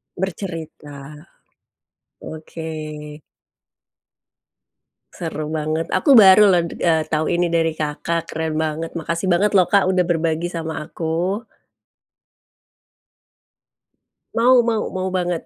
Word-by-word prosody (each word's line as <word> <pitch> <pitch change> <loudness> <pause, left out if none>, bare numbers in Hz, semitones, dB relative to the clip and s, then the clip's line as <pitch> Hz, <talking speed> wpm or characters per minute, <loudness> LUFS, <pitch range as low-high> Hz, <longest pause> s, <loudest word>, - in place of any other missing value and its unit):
Bercerita, 160 -6 -6 1.1
oke. 160 +1 -9 2.5
Seru 155 -2 -5
banget, 155 +1 -2
aku 275 -5 +5
baru 205 0 +8
loh, 175 - +3 0.2
eee, 160 -2 +2
tahu 155 0 0
ini 175 0 +1
dari 165 -1 +2
Kakak, 160 +2 -2
keren 160 -1 -3
banget. 160 +1 -2
Makasih 170 +3 -3
banget 195 +4 +2
loh 185 -3 +4
Kak, 200 -1 +4
udah 185 -1 +2
berbagi 165 0 -1
sama 160 -2 -5
aku. 170 +7 -3 2.9
Mau 245 +3 +4
mau 225 -2 +1
mau 185 0 -2
banget. 180 -2 -1
170 Hz, 100 wpm, -20 LUFS, 160-185 Hz, 2.9 s, baru